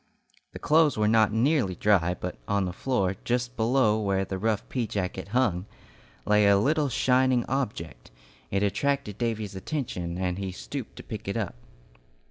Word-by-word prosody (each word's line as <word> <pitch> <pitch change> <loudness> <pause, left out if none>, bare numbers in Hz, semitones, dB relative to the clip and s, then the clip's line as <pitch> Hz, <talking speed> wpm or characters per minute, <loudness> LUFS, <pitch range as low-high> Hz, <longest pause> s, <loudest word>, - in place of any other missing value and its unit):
The - - -6
clothes 155 -3 +3
were 105 0 +2
not 110 -1 +4
nearly 115 - +2
dry, 90 -3 +2
but 90 - -5
on 100 -2 +1
the 90 - -4
floor, 100 -4 -1
just 125 +1 -1
below 110 -2 +2
where 95 -1 0
the 95 0 -4
rough 110 0 -1
pea 125 -4 -2
jacket 95 -2 -3
hung, 105 -5 0 0.6
lay 105 -1 +4
a 100 0 +6
little 145 +7 +2
shining 130 -1 +2
object. 120 -11 -3 0.4
It 100 +1 0
attracted 105 +1 -1
Davy's 110 -4 -2
attention, 95 - -4
and 90 0 -2
he 95 -1 -3
stooped - - -7
and - - -11
picked - - -7
it - - -2
up. - - -2
105 Hz, 165 wpm, -27 LUFS, 95-125 Hz, 0.6 s, a